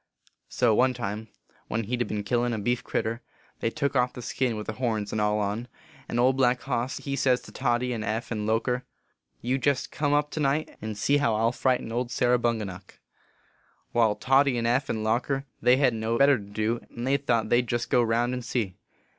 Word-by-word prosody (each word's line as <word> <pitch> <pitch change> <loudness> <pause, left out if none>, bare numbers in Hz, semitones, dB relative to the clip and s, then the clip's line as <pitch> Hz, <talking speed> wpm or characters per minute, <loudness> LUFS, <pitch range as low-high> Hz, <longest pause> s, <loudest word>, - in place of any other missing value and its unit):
So 120 -3 +2
one 125 +3 +3
time, 110 -1 -4 0.4
when 115 +1 -1
he 115 +4 -2
d 120 - 0
been 105 -1 -3
killin 120 +3 0
a - - -1
beef 120 +4 -1
critter, 115 +3 -2 0.4
they - - 0
took 140 +4 -2
off 125 -1 +2
the 125 - -8
skin 125 -2 -1
with 105 - -5
the 110 - -4
horns 110 -4 -1
and 110 - -1
all 105 0 +2
on; 105 +3 -2 0.4
and 120 - -1
Old 130 +2 +4
Black 125 -1 +3
Hoss 125 -1 -2
he 140 -1 -3
says 130 -2 +2
to - - -13
Toddy 125 -1 0
and 110 -2 -3
Eph 110 +3 -3
and 105 -2 -2
Loker, 125 +3 0 0.6
You 130 +3 0
jest 140 -1 0
come 145 -1 0
up 145 0 +2
to - - -4
night, 145 +2 0
and 110 -1 -5
see 140 +7 +2
how 115 -6 +2
I 110 - 0
ll 115 - +3
frighten 125 -2 0
old 120 +1 -1
Sarah 125 0 +2
Bunga 115 -2 0
nuck. 95 0 -10 0.5
" - - -38
Wai, 115 -3 +3
Toddy 135 0 +3
and 115 - -1
Eph 125 +4 +1
and 110 -1 -1
Loker, 125 +5 0 0.2
they 125 +1 +5
hedn 135 -2 +4
t 115 - -5
no 115 +1 0
better 140 -1 +5
to - - -9
do, 110 +3 -1
and 120 - -6
they 135 +1 +3
thought 120 -5 0
they 120 - +4
d 125 - -10
jest 120 +1 -2
go 125 - +5
round 120 +2 +1
and 125 -1 -4
see. 115 -6 -2
120 Hz, 230 wpm, -27 LUFS, 110-130 Hz, 0.6 s, they